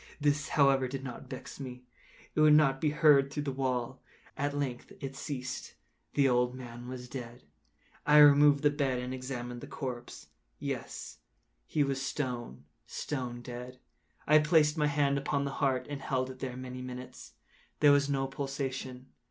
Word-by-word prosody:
This, 145 -1 +1
however, 135 -2 +4
did 135 +1 -5
not 130 -1 -8
vex 130 +1 -8
me; 125 -2 -7 0.5
it - - -1
would 155 -1 +7
not 135 -3 +4
be 155 - +3
heard 145 -2 +5
through 145 +1 -3
the 140 - -2
wall. 130 -1 -2 0.3
At 145 0 -2
length 130 -4 -3
it 135 0 -6
ceased. 130 -3 -5 0.4
The 140 -1 +4
old 125 0 +2
man 120 -1 -9
was 125 -1 -7
dead. 120 -2 -8 0.6
I 150 0 +5
removed 145 -1 +7
the 145 - +5
bed 140 -3 0
and 125 +1 -4
examined 125 -2 -5
the - - -8
corpse. 125 -3 -6 0.3
Yes, - - -5 0.5
he 150 - +2
was 135 -1 -1
stone, 125 - -4 0.2
stone 125 -4 -4
dead. 125 +1 -8 0.5
I 155 +1 +6
placed 150 0 +4
my 150 -2 +2
hand 140 -1 +2
upon 140 0 -1
the 140 - -2
heart 130 -2 +2
and 145 -1 -5
held 130 -1 -1
it 130 - -12
there 125 -2 -4
many 130 0 -6
minutes. 125 0 -8 0.5
There 145 -1 +7
was 145 0 +4
no 135 -1 +1
pulsation. 135 -2 -4
135 Hz, 170 wpm, -31 LUFS, 125-145 Hz, 0.6 s, would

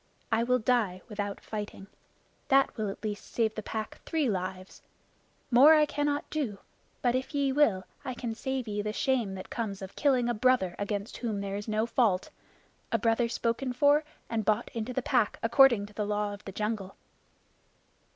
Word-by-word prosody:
I 225 0 +3
will 250 +2 +3
die 215 -6 +1
without 205 -2 -4
fighting. 210 -2 -6 0.6
That 270 -1 +4
will 215 -3 -2
at 195 - -8
least 210 -1 -3
save 225 -2 +1
the 215 - -4
Pack 215 0 -5
three 315 -4 0
lives. 185 -2 -4 0.7
More 280 +6 +8
I 305 -1 +5
cannot 290 0 -1
do; 265 -10 -2 0.5
but 245 -1 +3
if 260 +4 -2
ye 280 -1 +2
will, 245 -10 +3 0.2
I 255 - -4
can 235 -2 -4
save 260 +1 -3
ye 205 -1 -2
the 210 +1 -3
shame 235 -6 0
that 185 - -9
comes 215 -5 -3
of 190 -1 -9
killing 260 -4 +2
a 240 - +1
brother 235 -6 +2
against 205 +1 -3
whom 220 -4 -2
there 200 0 -3
is 205 +2 -5
no 215 +1 +1
fault 220 -6 +1 0.6
a - - +3
brother 230 0 +2
spoken 240 +3 -1
for 290 +4 +4 0.2
and 225 -1 -1
bought 215 +3 0
into 230 +1 -3
the 250 0 -2
Pack 245 -6 +2
according 235 -2 +5
to 210 - -14
the 210 0 -2
Law 210 0 -1
of 200 - -11
the 195 - -6
Jungle." 210 -1 -3
225 Hz, 185 wpm, -29 LUFS, 205-255 Hz, 0.7 s, More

